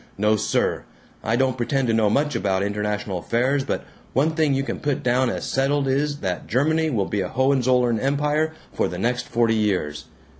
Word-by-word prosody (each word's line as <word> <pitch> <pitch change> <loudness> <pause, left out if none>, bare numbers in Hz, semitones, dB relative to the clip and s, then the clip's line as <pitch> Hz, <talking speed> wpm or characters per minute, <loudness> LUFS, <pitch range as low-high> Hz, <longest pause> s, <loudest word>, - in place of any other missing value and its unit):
No, 105 +2 +3
sir! 105 - 0 0.4
I 110 - +1
don't 130 0 +1
pretend 130 +2 0
to 115 - +2
know 110 -2 +3
much 145 +7 +1
about 95 -1 0
international 105 -2 -2
affairs 130 +8 +1
but - - -3 0.3
one 145 +5 +2
thing 155 -3 +1
you 135 - 0
can - - -4
put 145 -3 -2
down 125 +1 +2
as - - -3
settled 135 +1 +1
is 145 +2 0
that 90 -3 -3
Germany 155 +6 +1
will 105 -8 0
be 100 +1 -2
a 90 - -2
Hohenzollern 125 -3 +2
empire 150 +4 +1 0.2
for - - 0
the 90 - -5
next 125 +5 -1
forty 115 -1 +2
years. 90 -9 -1
125 Hz, 190 wpm, -23 LUFS, 105-140 Hz, 0.4 s, No